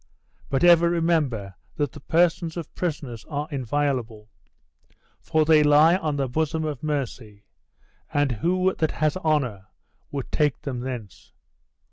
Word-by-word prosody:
But 135 +2 0
ever 170 -1 +6
remember 155 - 0 0.2
that 145 -4 -1
the - - -11
persons 165 +2 +1
of 165 - -7
prisoners 145 -10 -4
are 150 0 -4
inviolable, 125 -5 -2 0.9
for 155 -1 +1
they 155 -1 +6
lie 150 +3 +6
on 155 -5 -2
the 135 -2 -1
bosom 160 +4 -1
of 145 -5 -4
mercy; 125 -8 -4 0.7
and 145 -2 +1
who 185 - +1
that 160 - +1
has 155 -1 0
honor 135 - -1 0.4
would 140 -3 -5
take 150 -5 0
them 130 -4 -4
thence?" 120 -6 -7
145 Hz, 135 wpm, -24 LUFS, 125-160 Hz, 0.9 s, ever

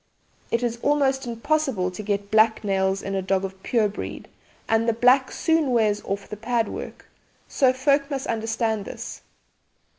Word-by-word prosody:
It 230 +1 0
is 235 -1 -1
almost 275 -3 +1
impossible 240 -5 0
to 180 - -7
get 200 -1 -2
black 220 +1 +4
nails 195 -1 0
in 195 - -4
a 195 - 0
dog 195 0 0
of 190 0 -9
pure 225 -1 +2
breed 205 - -7 0.4
and 225 +1 +2
the - - +2
black 250 +3 +4
soon 320 -3 +1
wears 215 -4 +2
off 195 0 -3
the 210 - -7
pad 230 0 0
work, - - -7 0.4
so 260 -2 +3
folk 275 +2 +1
must 275 -2 -3
understand 225 -2 -1
this. - - -8
225 Hz, 170 wpm, -24 LUFS, 200-260 Hz, 0.4 s, black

